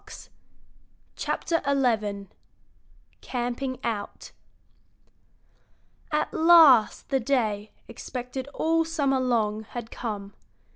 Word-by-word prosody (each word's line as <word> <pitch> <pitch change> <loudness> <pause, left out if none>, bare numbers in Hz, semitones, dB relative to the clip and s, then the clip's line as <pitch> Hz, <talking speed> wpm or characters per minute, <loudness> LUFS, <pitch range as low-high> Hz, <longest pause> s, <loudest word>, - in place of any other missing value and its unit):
XI 330 -1 -1 1.6
CAMPING 250 +1 -3
OUT 210 -3 -5 1.8
At 300 0 -1
last 320 -9 +6
the 270 -1 +1
day, 220 -5 -1 0.2
expected 250 +2 -6
all 325 +3 0
summer 285 -5 0
long, 220 -4 0
had 225 +1 -8
come. 205 -4 -6
250 Hz, 75 wpm, -26 LUFS, 225-285 Hz, 1.8 s, last